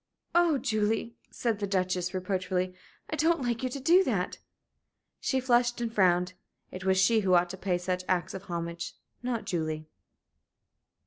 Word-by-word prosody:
"Oh, 345 -4 +4
Julie," 225 -2 0 0.2
said 230 -4 -1
the 200 - -1
Duchess, 185 -2 0
reproachfully, 185 -1 -1 0.4
"I - - 0
don't 320 -1 +2
like 235 -2 -1
you 255 - -1
to 275 - -5
do 345 +8 +5
that!" - - -1 0.8
She 265 - 0
flushed 240 -1 +2
and 235 -2 -2
frowned. 180 -3 +3 0.4
It 185 - -7
was 190 0 +3
she 205 +5 +5
who 190 -3 +3
ought 175 0 +3
to - - -5
pay 185 -2 0
such 180 +1 -2
acts 180 -2 +1
of 190 +1 -7
homage, 170 -2 -4 0.3
not 245 -2 -2
Julie. 155 -3 -2
190 Hz, 165 wpm, -29 LUFS, 180-240 Hz, 0.8 s, do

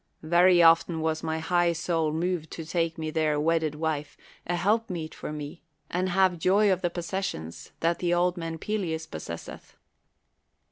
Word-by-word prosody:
Very 175 +2 +5
often 165 0 +5
was 160 0 -1
my 160 -1 -2
high 175 +1 +2
soul 165 -2 0
moved 165 0 -2
to 165 - -6
take 165 0 -1
me 155 -1 -3
there 155 -1 +1
a 150 - 0
wedded 160 -1 +1
wife, 150 -1 -3 0.3
a 175 - 0
helpmeet 180 -3 -1
for - - -6
me, 150 +2 -7 0.3
and 185 +1 0
have 185 -1 +2
joy 195 +4 +4
of 185 - -3
the 175 - +1
possessions 170 - -5
that 165 +1 +1
the 175 -1 0
old 175 +1 +2
man 165 -2 -5
Pe 215 +6 -2
leus 160 -4 -3
possesseth. 85 - -8
165 Hz, 175 wpm, -27 LUFS, 160-180 Hz, 0.3 s, Very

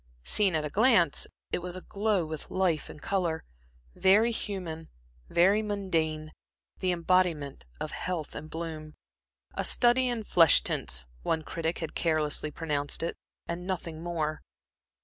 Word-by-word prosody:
Seen 195 - +2
at 155 -1 0
a - - -3
glance, 225 - +4 0.2
it - - +1
was 180 0 -5
aglow 200 0 0
with 155 -1 -7
life 180 -5 0
and - - -10
color, 170 -3 -1 0.5
very 210 +5 +5
human, 180 -8 -5 0.4
very 195 +5 +4
mundane, 165 -7 -1 0.5
the 185 -1 +1
embodiment 170 - +1
of - - -4
health 175 -5 -3
and 155 +1 -7
bloom. 160 -2 -6 0.6
A - - -2
study 250 +1 +4
in 240 -3 -1
flesh 165 - +5
tints, 60 0 0 0.2
one 160 - 0
critic 165 0 -2
had 160 - -5
carelessly 155 -2 0
pronounced 150 -2 -1
it, 170 - -2 0.3
and 175 +2 -4
nothing 170 -4 -4
more. 160 -3 -2
170 Hz, 140 wpm, -29 LUFS, 155-190 Hz, 0.6 s, very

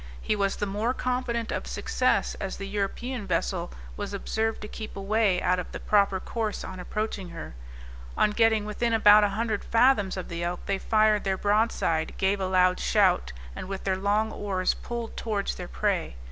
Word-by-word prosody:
He 215 - 0
was 200 -1 0
the - - -2
more 210 +5 -1
confident 250 -2 -2
of - - -3
success, - - 0
as 195 - -4
the 195 - -5
European 205 +3 -3
vessel 175 0 -1 0.2
was 205 -1 -4
observed 220 +2 -1
to 210 - -6
keep 215 0 -8
away 200 -1 +1
out 180 0 +2
of 180 - -6
the - - -6
proper 200 -2 +2
course 220 +1 -3
on 185 -1 -7
approaching 200 0 -3
her. - - -8 0.6
On 210 - +3
getting 220 -1 +3
within 230 +2 -1
about 210 -1 +7
an 205 - +3
hundred 215 +1 -2
fathoms 230 -5 +3
of 185 - -5
the 170 0 -4
Elk 175 +1 -2
they 195 -1 -1
fired 215 0 +3
their 190 -1 0
broadside, 205 -6 +1
gave 195 +1 +1
a 190 - -1
loud 185 0 +3
shout, - - +2 0.2
and - - -6
with 195 0 -5
their 190 -1 +1
long 205 +3 +1
oars 190 -4 0
pulled 235 -1 -6
towards 210 -3 -2
their - - -7
prey. - - -1
205 Hz, 190 wpm, -27 LUFS, 190-220 Hz, 0.6 s, about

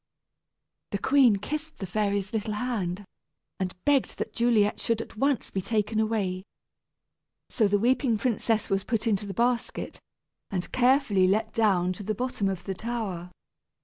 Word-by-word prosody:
The 200 - -1
queen 260 0 +5
kissed 305 +10 -5
the 195 - -4
fairy's 200 +1 -1
little 215 -1 -2
hand, 205 -5 -2 0.5
and 185 -1 -2
begged 285 -3 +2
that 220 - -4
Juliet 225 -3 +2
should 230 -1 0
at 230 - -7
once 275 +3 0
be 190 - -1
taken 215 +2 0
away. 210 -4 0 1.1
So 220 -4 +3
the 205 +1 +3
weeping 240 +1 +2
princess 225 -1 0
was 195 -2 0
put 225 -2 -1
into 205 -2 0
the 195 - -6
basket, 240 +2 -1 0.5
and 180 -2 -3
carefully 245 -7 +3
let 215 +3 +1
down 185 -5 +2
to 185 - -9
the 210 +2 -2
bottom 245 -4 -1
of 185 -2 -4
the 195 - -3
tower. 195 -5 -4
215 Hz, 155 wpm, -27 LUFS, 195-235 Hz, 1.1 s, queen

